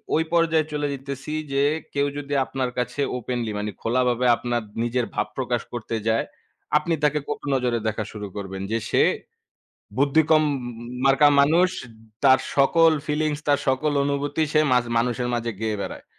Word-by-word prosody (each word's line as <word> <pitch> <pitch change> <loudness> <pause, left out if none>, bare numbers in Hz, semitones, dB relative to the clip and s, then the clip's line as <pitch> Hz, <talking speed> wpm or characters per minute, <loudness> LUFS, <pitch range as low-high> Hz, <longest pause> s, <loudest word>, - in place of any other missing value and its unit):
ওই 160 - +3
পর্যায়ে 165 -2 +3
চলে 145 -1 -1
যাইতেছি 140 +1 -6 0.2
যে, 140 +1 +2 0.3
কেউ 140 0 +1
যদি 145 0 -5
আপনার 130 -2 -2
কাছে 125 +3 -2 0.2
ওপেনলি, 120 -2 -3
মানে 105 0 -3
খোলাভাবে 125 +1 +1
আপনার 120 -1 -2 0.2
নিজের 120 0 0
ভাব 105 - -1
প্রকাশ 125 -2 -1
করতে 115 -1 -4
যায়, 110 +1 +2 0.5
আপনি 165 +2 -1
তাকে 150 0 +3
কটু 145 - -5
নজরে 125 -2 0
দেখা 110 0 -1
শুরু 105 -1 -6
করবেন 95 -1 -5
যে 115 - +2
সে - - +3 1.0
বুদ্ধিকম 155 +2 +4 0.6
মার্কা 135 +2 +6
মানুষ। 165 +6 +4 0.6
তার 130 -1 +6 0.2
সকল 165 +4 +5 0.2
ফিলিংস, 150 0 0
তার 145 - +4
সকল 145 +3 +1
অনুভূতি 145 +2 -1
সে 155 - +4
মাঝ 125 -1 +4
মানুষের 120 +1 -1
মাঝে 115 -1 -2
গেয়ে 110 -2 -1
বেড়ায়। - - -7
135 Hz, 155 wpm, -24 LUFS, 120-150 Hz, 1.0 s, মার্কা